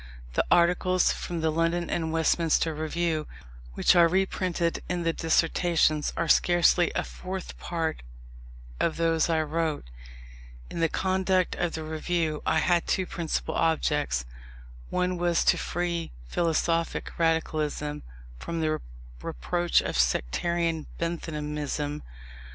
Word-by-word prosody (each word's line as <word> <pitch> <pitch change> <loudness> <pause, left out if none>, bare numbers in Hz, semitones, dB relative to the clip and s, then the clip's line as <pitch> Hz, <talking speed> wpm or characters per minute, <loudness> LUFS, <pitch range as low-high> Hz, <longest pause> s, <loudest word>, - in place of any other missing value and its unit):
The - - +2
articles 180 +1 +3
from 170 -2 -4
the 160 0 +1
London 165 +2 0
and 160 -2 -1
Westminster 165 0 +2
Review 155 0 -1 0.5
which - - +4
are 170 -1 +7
reprinted 180 -1 0
in 175 -1 -1
the 165 0 +1
Dissertations, 165 -1 +2
are 170 - 0
scarcely 175 +1 +4
a - - +1
fourth 185 0 -7
part 165 -2 -2 0.8
of 160 - 0
those 165 0 +2
I 160 -1 +2
wrote. 155 - -2 0.8
In - - -5
the 165 -1 +2
conduct 185 0 +1
of 175 -2 -1
the 160 - -4
Review 160 0 -1
I - - +3
had 170 +1 +2
two 185 - +1
principal 170 -3 -3
objects. 150 - +1 0.6
One 180 0 0
was 175 -1 +2
to - - +4
free 170 -1 -2
philosophic 165 - -1
radicalism 155 -2 0 0.4
from 170 -1 -4
the 155 -1 0 0.4
reproach 175 - +1
of - - -4
sectarian 160 - 0
Benthamism. 150 -3 -3
165 Hz, 120 wpm, -27 LUFS, 155-175 Hz, 0.8 s, are